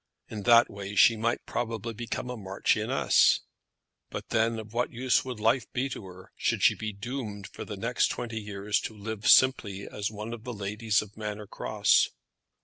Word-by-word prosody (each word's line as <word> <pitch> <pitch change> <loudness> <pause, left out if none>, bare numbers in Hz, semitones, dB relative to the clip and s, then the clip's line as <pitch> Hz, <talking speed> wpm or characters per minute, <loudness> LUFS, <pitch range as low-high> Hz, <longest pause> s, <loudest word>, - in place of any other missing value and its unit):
In 110 -2 -5
that 115 0 +8
way 100 0 -7
she 115 +3 +7
might 115 +2 -1
probably 115 -1 -3
become 120 +2 -4
a - - -4
marchioness; 95 -3 +2 0.7
but - - -7
then 115 +1 +1
of 110 0 -8
what 120 +1 0
use 130 +3 +1
would 125 -4 -6
life 115 +3 +1
be 130 +2 -1
to 110 -6 -7
her, 95 0 -13
should - - 0
she - - +6
be 110 -1 -4
doomed 105 -1 -6
for - - -8
the 105 - -6
next 115 +5 +1
twenty 115 -2 -4
years 105 0 -1
to 110 - -6
live 110 0 -4
simply 105 -7 +4
as 105 0 -3
one 110 +2 -6
of 115 -2 -8
the 125 0 -5
ladies 105 +1 0
of 105 0 -15
Manor 105 -1 -5
Cross? - - +2
110 Hz, 185 wpm, -28 LUFS, 105-120 Hz, 0.7 s, that